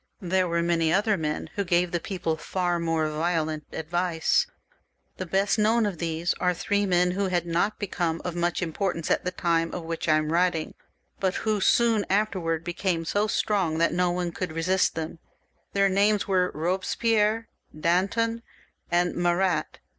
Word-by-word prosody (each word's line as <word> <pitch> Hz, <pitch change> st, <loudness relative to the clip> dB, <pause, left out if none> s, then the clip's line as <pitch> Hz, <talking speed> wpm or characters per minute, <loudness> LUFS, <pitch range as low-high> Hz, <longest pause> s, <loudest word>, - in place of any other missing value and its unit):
There 185 Hz, -1 st, +1 dB
were 170 Hz, 0 st, 0 dB
many 165 Hz, -2 st, +1 dB
other 205 Hz, +3 st, +2 dB
men 150 Hz, -3 st, -3 dB
who 200 Hz, -, -1 dB
gave 175 Hz, -1 st, +1 dB
the 175 Hz, -, 0 dB
people 175 Hz, -2 st, -2 dB
far 175 Hz, +2 st, -1 dB
more 165 Hz, -2 st, 0 dB
violent 155 Hz, -1 st, -1 dB
advice. 170 Hz, +1 st, 0 dB, 0.7 s
The 185 Hz, -, -5 dB
best 195 Hz, +4 st, +1 dB
known 220 Hz, +2 st, +3 dB
of 195 Hz, -6 st, -3 dB
these 165 Hz, +1 st, -1 dB
are 180 Hz, 0 st, +1 dB
three 205 Hz, +3 st, 0 dB
men 180 Hz, -1 st, +3 dB
who 195 Hz, +2 st, -1 dB
had 175 Hz, -2 st, 0 dB
not 175 Hz, +5 st, 0 dB
become 175 Hz, -5 st, -2 dB
of 180 Hz, -1 st, -3 dB
much 175 Hz, +1 st, 0 dB
importance 170 Hz, 0 st, -2 dB
at -, -, +1 dB
the -, -, +1 dB
time 165 Hz, -2 st, 0 dB
of 175 Hz, -, -5 dB
which 165 Hz, 0 st, -3 dB
I 155 Hz, -, +5 dB
am 155 Hz, 0 st, -1 dB
writing, 175 Hz, -2 st, +1 dB, 0.5 s
but 190 Hz, -1 st, 0 dB
who 215 Hz, -2 st, 0 dB
soon 230 Hz, 0 st, +3 dB
afterwards 185 Hz, -5 st, 0 dB
became 175 Hz, -1 st, -1 dB
so 205 Hz, +5 st, +1 dB
strong 190 Hz, -7 st, 0 dB
that 170 Hz, +1 st, +2 dB
no 180 Hz, 0 st, +2 dB
one 175 Hz, 0 st, -2 dB
could 175 Hz, -1 st, -4 dB
resist 180 Hz, +4 st, +1 dB
them. 160 Hz, +1 st, -5 dB, 0.5 s
Their 200 Hz, 0 st, +3 dB
names 200 Hz, +2 st, +2 dB
were 185 Hz, -2 st, +2 dB
Eobespierre, 210 Hz, +6 st, 0 dB, 0.3 s
Danton, 225 Hz, +8 st, +1 dB, 0.5 s
and 175 Hz, +1 st, +2 dB
Marat. 175 Hz, -1 st, 0 dB
180 Hz, 170 wpm, -26 LUFS, 165-195 Hz, 0.7 s, I